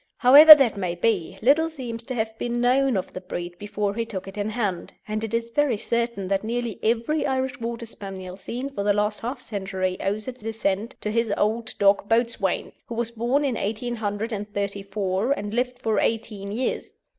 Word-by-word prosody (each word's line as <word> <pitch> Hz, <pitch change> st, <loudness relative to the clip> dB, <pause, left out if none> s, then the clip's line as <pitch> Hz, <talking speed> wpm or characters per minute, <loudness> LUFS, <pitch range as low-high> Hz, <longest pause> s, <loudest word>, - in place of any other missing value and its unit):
However 295 Hz, +5 st, +11 dB
that 255 Hz, -8 st, +1 dB
may 180 Hz, -3 st, -2 dB
be, 185 Hz, -2 st, 0 dB
little 310 Hz, +6 st, +4 dB
seems 245 Hz, -7 st, -6 dB
to 255 Hz, -, -4 dB
have 220 Hz, -1 st, -2 dB
been 240 Hz, 0 st, -2 dB
known 255 Hz, 0 st, +3 dB
of 185 Hz, -, -4 dB
the 185 Hz, -, -6 dB
breed 175 Hz, -1 st, -6 dB
before 205 Hz, -1 st, -2 dB
he 230 Hz, +2 st, -1 dB
took 195 Hz, -5 st, -6 dB
it 195 Hz, -, -9 dB
in 205 Hz, 0 st, -2 dB
hand, 205 Hz, -6 st, -3 dB
and 215 Hz, +1 st, -3 dB
it 225 Hz, -, -4 dB
is 230 Hz, 0 st, -2 dB
very 285 Hz, -4 st, +2 dB
certain 235 Hz, -3 st, -2 dB
that 195 Hz, +1 st, 0 dB
nearly 235 Hz, -1 st, -3 dB
every 235 Hz, +7 st, +1 dB
Irish 265 Hz, -1 st, -1 dB
Water 235 Hz, 0 st, -4 dB
Spaniel 190 Hz, -4 st, -8 dB
seen 250 Hz, +7 st, -5 dB
for 240 Hz, -, -4 dB
the 205 Hz, 0 st, +3 dB
last 210 Hz, 0 st, 0 dB
half 245 Hz, +3 st, -4 dB
century 190 Hz, -4 st, -3 dB
owes 210 Hz, +4 st, -2 dB
its 255 Hz, -2 st, -7 dB
descent 220 Hz, +1 st, -2 dB
to 210 Hz, -, -2 dB
his 230 Hz, -1 st, 0 dB
old 220 Hz, +2 st, -1 dB
dog 200 Hz, 0 st, +3 dB
Boatswain, 225 Hz, -5 st, 0 dB, 0.2 s
who 235 Hz, -, -6 dB
was 235 Hz, 0 st, -1 dB
born 240 Hz, +5 st, 0 dB
in 270 Hz, -, 0 dB
1834 205 Hz, -1 st, -2 dB
and 205 Hz, -6 st, -5 dB
lived 250 Hz, +1 st, -1 dB
for 225 Hz, -3 st, 0 dB
eighteen 215 Hz, -3 st, -2 dB
years. 245 Hz, +5 st, -3 dB
225 Hz, 190 wpm, -24 LUFS, 200-240 Hz, 0.2 s, However